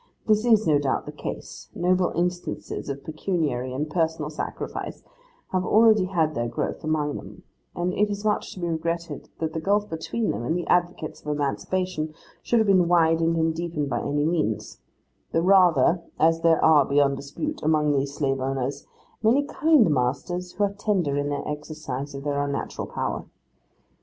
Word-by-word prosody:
This 215 0 +3
is, 220 -3 +4
no 150 -2 +4
doubt, 135 -2 -1
the - - -6
case; - - -7
noble 180 0 +2
instances 175 -3 -3
of 140 0 -5
pecuniary 155 -6 -2
and 140 +4 -2
personal 160 -1 -1
sacrifice 155 - -5 0.5
have 185 -1 +1
already 215 0 +5
had 165 -4 0
their 120 -3 -1
growth 115 - -3
among 155 -2 0
them; - - -11 0.3
and 175 +1 -1
it 210 0 +2
is 205 +1 -4
much 210 -1 0
to - - -9
be 175 - -2
regretted 170 +1 -3
that 160 -1 -3
the 160 - -2
gulf 205 +3 +1
between 185 +8 -2
them 105 - -4
and 160 +8 0
the 175 - -3
advocates 175 -2 0
of - - -15
emancipation 155 +3 -2 0.3
should 240 - +1
have 220 - +3
been 185 -4 +4
widened 165 -1 +3
and 160 0 +2
deepened 160 -3 -3
by - - -1
any 145 +1 0
means: 155 - -1 0.5
the 165 - +2
rather, 180 -4 +5 0.2
as 165 +1 +3
there 165 -1 +4
are, 155 -3 +7
beyond 140 0 +2
dispute, 150 - -5
among 150 -1 +2
these 140 0 -1
slave 135 -3 0
owners, 135 +1 -3 0.3
many 240 +6 +4
kind 300 -4 +4
masters 150 +8 -1
who 205 - 0
are 200 -1 +1
tender 195 -8 0
in 145 0 -1
the 145 -1 -3
exercise 150 -2 -5
of 140 - -6
their 145 -1 0
unnatural 140 -1 -3
power. - - -3
160 Hz, 175 wpm, -25 LUFS, 145-180 Hz, 0.5 s, are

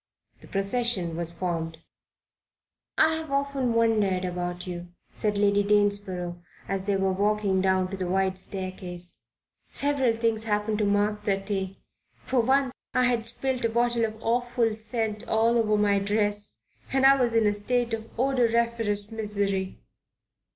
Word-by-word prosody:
The - - -15
procession 195 -4 +1
was 170 0 -1
formed. 165 -2 -3 1.2
"I've 320 0 +2
often 275 -3 0
wondered 210 -5 +2
about 175 0 -4
you," 175 -1 -6 0.3
said 210 -1 -1
Lady 200 0 +3
Danesborough, 200 -4 0 0.3
as 195 0 -2
they 200 - +2
were 195 0 +1
walking 200 0 +1
down 190 0 +1
the 185 -2 -3
wide 190 0 +1
staircase. 185 -2 -2 0.4
"Several 275 -5 +1
things 225 -1 -1
happened 210 0 0
to 210 - +2
mark 205 +1 0
that 195 -1 0
day. 195 -2 -3 0.5
For 260 - +1
one, 265 +2 +2 0.2
I 255 - +4
had 240 -2 +2
spilled 255 +1 -3
a 230 - +2
bottle 235 0 +1
of 220 0 -6
awful 240 -1 +1
scent 220 -1 -2
all 225 +2 +2
over 215 -2 +2
my 205 -1 +3
dress 205 0 -1 0.3
and 270 0 +3
I 275 0 +6
was 240 -2 +1
in 225 -1 +4
a 205 - +3
state 235 +3 -1
of 225 0 -4
odoriferous 235 -4 +1
misery." 200 -3 -2
210 Hz, 145 wpm, -26 LUFS, 195-235 Hz, 1.2 s, I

